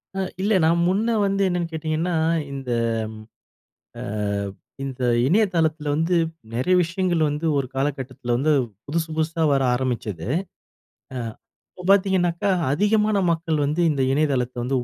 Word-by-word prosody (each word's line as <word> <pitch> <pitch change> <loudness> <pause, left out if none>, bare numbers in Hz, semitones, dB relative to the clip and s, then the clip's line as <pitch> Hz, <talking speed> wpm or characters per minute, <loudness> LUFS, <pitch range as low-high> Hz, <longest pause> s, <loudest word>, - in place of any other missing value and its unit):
அ - - -2 0.2
இல்ல 205 +3 +2
நான் 170 +1 +3
முன்ன 220 +5 +1
வந்து 195 0 0
என்னன்னு 175 -2 -1
கேட்டிங்கன்னா, 160 +2 -1 0.4
இந்த 135 -2 -5 1.3
ஆ - - -5 0.8
இந்த 130 -1 -5 0.2
இணையதளத்தில 165 -4 +1
வந்து 165 +4 +1 0.4
நிறைய 130 +10 +2
விஷயங்கள் 175 -1 0
வந்து 150 +3 -3
ஒரு 135 - -1
காலக்கட்டத்தில 135 -3 -2
வந்து 150 +5 +2 0.3
புதுசு 160 +2 -1
புதுசா 160 +1 0
வர 135 -1 +3
ஆரம்பிச்சது, 120 -9 -3 0.9
அ 130 - -3 0.5
இப்போ 180 - -11
பார்த்தீங்கனாக்கா, 190 -2 +3 0.2
அதிகமான 210 +4 +2
மக்கள் 160 -1 0
வந்து 150 +4 0
இந்த 140 -3 0
இணையதளத்த 135 -4 0
வந்து 130 +2 0
160 Hz, 125 wpm, -23 LUFS, 135-180 Hz, 1.3 s, நான்